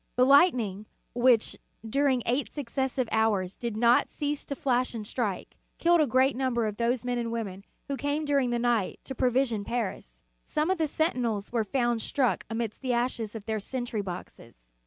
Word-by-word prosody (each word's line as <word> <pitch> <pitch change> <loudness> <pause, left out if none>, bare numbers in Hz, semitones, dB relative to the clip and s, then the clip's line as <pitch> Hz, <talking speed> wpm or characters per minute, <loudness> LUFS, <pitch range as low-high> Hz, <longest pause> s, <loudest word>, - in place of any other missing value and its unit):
The 250 - +5
lightning, 245 - +4 0.3
which, 240 -2 +3 0.3
during 265 0 +2
eight 245 -1 0
successive 265 -2 -2
hours, 210 -4 +1
did 235 -3 -4
not 235 +1 +4
cease 290 0 -3
to 280 - -4
flash 255 -3 0
and 215 -2 -5
strike, 210 -4 -3 0.2
killed 340 -1 +4
a 300 - +3
great 260 +2 +3
number 250 -3 0
of 210 -1 -3
those 240 +1 0
men 245 -1 -1
and 230 -1 -3
women 200 -5 -4 0.2
who 280 - -2
came 290 +2 -1
during 280 -3 +2
the 240 - 0
night 235 -4 0
to 265 - -6
provision 250 -4 +1
Paris. 190 - -4 0.2
Some 305 +4 0
of 375 - 0
the 315 - +2
sentinels 245 -10 -1
were 235 -2 +1
found 240 +1 0
struck 250 -8 0
amidst 225 -1 -3
the 255 -2 0
ashes 235 -3 -1
of 215 -2 -7
their 220 -1 -1
sentry 240 0 -3
boxes. 175 - -9
240 Hz, 180 wpm, -28 LUFS, 220-265 Hz, 0.3 s, The